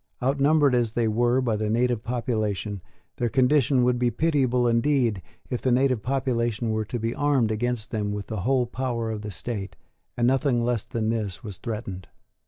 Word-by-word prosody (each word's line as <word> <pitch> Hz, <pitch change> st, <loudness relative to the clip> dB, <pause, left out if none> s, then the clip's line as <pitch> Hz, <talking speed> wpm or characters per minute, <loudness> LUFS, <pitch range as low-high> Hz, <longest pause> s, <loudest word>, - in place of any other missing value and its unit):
Outnumbered 140 Hz, +1 st, +3 dB
as 120 Hz, -2 st, +1 dB
they 115 Hz, -2 st, +2 dB
were 120 Hz, +4 st, +2 dB
by 120 Hz, -4 st, 0 dB
the 105 Hz, 0 st, -1 dB
native 120 Hz, 0 st, +1 dB
population, 110 Hz, -5 st, -2 dB, 0.4 s
their 120 Hz, -, 0 dB
condition 130 Hz, 0 st, +3 dB
would 125 Hz, 0 st, +2 dB
be 125 Hz, -1 st, +2 dB
pitiable 125 Hz, -2 st, +1 dB
indeed 115 Hz, -3 st, +2 dB, 0.3 s
if 125 Hz, -, -2 dB
the 130 Hz, -, +1 dB
native 130 Hz, -2 st, +2 dB
population 120 Hz, -3 st, -1 dB
were 110 Hz, 0 st, -1 dB
to 120 Hz, -, -4 dB
be 115 Hz, +1 st, -2 dB
armed 145 Hz, -6 st, +2 dB
against 120 Hz, 0 st, -2 dB
them 105 Hz, -2 st, -1 dB
with 105 Hz, -1 st, -4 dB
the 110 Hz, -, -4 dB
whole 130 Hz, +3 st, +2 dB
power 120 Hz, -2 st, -3 dB
of 110 Hz, -1 st, -4 dB
the 105 Hz, -, -6 dB
state; 100 Hz, 0 st, -4 dB, 0.4 s
and 120 Hz, -, +2 dB
nothing 130 Hz, -2 st, +2 dB
less 120 Hz, -3 st, 0 dB
than 110 Hz, -1 st, -2 dB
this 110 Hz, -4 st, -3 dB
was 105 Hz, -5 st, -7 dB
threatened. 105 Hz, -5 st, -5 dB
120 Hz, 185 wpm, -25 LUFS, 110-125 Hz, 0.4 s, Outnumbered